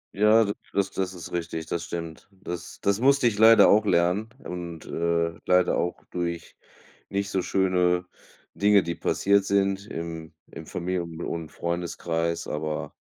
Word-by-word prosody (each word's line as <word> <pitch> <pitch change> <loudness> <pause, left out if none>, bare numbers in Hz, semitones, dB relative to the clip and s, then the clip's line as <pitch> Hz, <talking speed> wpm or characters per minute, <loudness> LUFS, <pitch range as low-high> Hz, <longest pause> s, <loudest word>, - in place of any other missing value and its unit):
Ja, 105 +2 +5
d 100 0 -1 0.2
das 100 -1 0
das 95 -1 -2
ist 85 -2 -9
richtig, 80 -2 -4
das 85 +1 -3
stimmt. 85 -1 -6
Das 90 -3 -8
das 100 +2 +1
musste 135 -1 +4
ich 105 -2 -1
leider 115 +1 +8
auch 105 +1 +5
lernen 90 +3 +2
und, 85 -2 -7
äh, 85 0 -1
leider 90 0 +3
auch 90 - -2
durch 85 -1 -4 0.5
nicht 100 0 -2
so 95 - 0
schöne 90 -1 +1 0.5
Dinge, 100 -1 +4
die 85 - -3
passiert 100 0 +2
sind 100 0 +1
im 80 -1 -6
im - - -10
Familien 85 -2 -4
und - - -3
und 80 -2 -4
Freundeskreis, 85 -1 -2
aber 75 0 -3
90 Hz, 155 wpm, -26 LUFS, 85-100 Hz, 0.5 s, leider